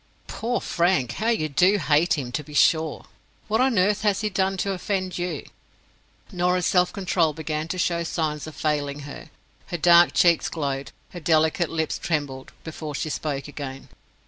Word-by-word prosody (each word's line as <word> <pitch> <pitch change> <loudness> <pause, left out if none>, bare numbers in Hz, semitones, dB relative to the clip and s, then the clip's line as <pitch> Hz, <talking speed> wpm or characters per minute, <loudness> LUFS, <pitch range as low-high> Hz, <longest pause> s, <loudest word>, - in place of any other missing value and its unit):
"Poor 240 +2 -2
Frank! 170 -9 +1
How 215 - -3
you 190 -10 +1
do 180 +8 +3
hate 155 -1 +2
him, 125 -4 -4
to 150 - -3
be 150 -1 -11
sure. 160 0 +2 0.4
What 220 +3 +1
on 255 -4 +2
earth 200 +3 +2
has 210 -2 +1
he 215 -1 -1
done 190 +1 0
to 195 +2 -1
offend 185 -1 -2
you?" 175 -4 -3 0.9
Norah's 180 0 +1
self 180 -1 +3
control 180 -5 +1
began 155 0 -3
to 185 - -4
show 170 -1 0
signs 155 -2 -2
of 155 - -9
failing 145 -2 -1
her. 145 0 -9 0.4
Her 175 - -3
dark 170 +1 +6
cheeks 170 -2 +3
glowed, 140 -3 -3 0.2
her 175 - -7
delicate 160 0 +2
lips 160 -1 -2
trembled, 145 -5 -3
before 155 -2 -6
she 155 - -2
spoke 140 -3 -3
again. 140 -2 -8
165 Hz, 170 wpm, -24 LUFS, 150-185 Hz, 0.9 s, dark